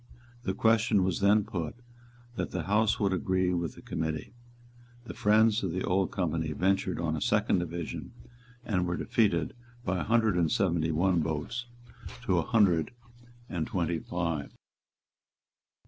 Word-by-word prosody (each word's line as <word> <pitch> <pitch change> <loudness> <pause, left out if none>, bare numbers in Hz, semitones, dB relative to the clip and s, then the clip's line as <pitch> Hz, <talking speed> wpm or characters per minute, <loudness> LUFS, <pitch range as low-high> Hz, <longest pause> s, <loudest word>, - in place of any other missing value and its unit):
The 95 - -1
question 110 -2 +3
was 95 -2 0
then 100 +2 +4
put, 90 -8 -4 0.6
that - - -2
the 90 -2 -3
House 105 +4 +2
would 100 -2 +2
agree 95 0 +1
with 85 -2 -2
the - - -13
Committee. 80 +5 -3 0.7
The 120 - -8
friends 110 +1 +3
of 95 -4 -2
the 95 - -2
Old 95 0 +1
Company 80 -4 -1
ventured 95 +1 0
on 80 -2 -1
a 75 - -4
second - - +2
division, 85 -1 -5 0.5
and 90 -5 0
were 85 - -1
defeated 90 -9 +1 0.3
by 90 0 0
a - - -1
hundred 110 -3 +2
and 85 -3 +2
seventy 85 -6 +1
one 85 +2 +2
votes 80 +11 -3 0.6
to - - +2
a - - +2
hundred 100 -6 +2 0.5
and 85 -6 -3
twenty 85 -2 -1
five. 85 -5 -3
90 Hz, 150 wpm, -29 LUFS, 85-105 Hz, 0.7 s, then